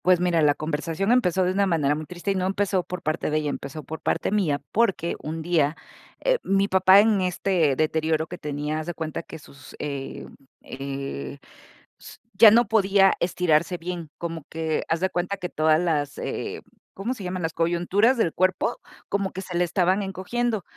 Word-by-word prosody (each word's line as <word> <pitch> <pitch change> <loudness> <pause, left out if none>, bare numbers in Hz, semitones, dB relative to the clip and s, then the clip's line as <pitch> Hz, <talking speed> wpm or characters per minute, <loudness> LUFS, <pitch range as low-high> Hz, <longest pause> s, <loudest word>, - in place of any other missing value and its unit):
Pues 180 -1 +5
mira, 175 -2 +2
la 145 -1 +4
conversación 165 +6 -2
empezó 190 -7 +3
de 180 - +1
una 200 +1 +1
manera 150 -5 +2
muy 155 0 -5
triste 180 +2 -3
y - - -1
no 185 0 0
empezó 195 -1 0
por 180 0 -7
parte 155 +1 -1
de 155 - +1
ella, 150 -1 -1
empezó 140 +3 -7
por 160 +4 -7
parte - - -1
mía, 175 -9 +1
porque 195 -6 +1
un 160 +1 -5
día, 160 -3 +1 0.5
eh, - - +2
mi 195 0 +2
papá 190 +1 +6
en 210 -2 +2
este 180 -5 +1
deterioro 160 +1 0
que 175 +2 -9
tenía, 150 +1 -3
haz 155 - -6
de 175 - -4
cuenta 160 -1 -4
que - - -10
sus, 140 -3 -15
eh, 140 -2 -5 0.4
eh, 135 - -6 0.6
s - - -12 0.2
ya 225 - +9
no 230 +2 +4
podía 195 -2 +4
estirarse 175 -1 +1
bien. 170 -2 -6
Como 165 -2 -5
que 160 -1 -2
haz 165 +1 0
de 190 0 0
cuenta 180 +3 -2
que 180 -2 -5
todas 155 -1 +3
las, 150 -5 -1
eh, - - -4 0.3
¿cómo 215 +6 -2
se 215 - -9
llaman?, 180 -1 -4
las 160 0 -2
coyunturas 175 +9 +2
del 175 -8 +1
cuerpo, 185 0 +1 0.3
como 200 -1 -1
que 190 - -6
se 180 - -7
le 175 - +3
estaban 185 +2 +1
encogiendo. 205 +3 -2
175 Hz, 195 wpm, -24 LUFS, 155-195 Hz, 0.6 s, ya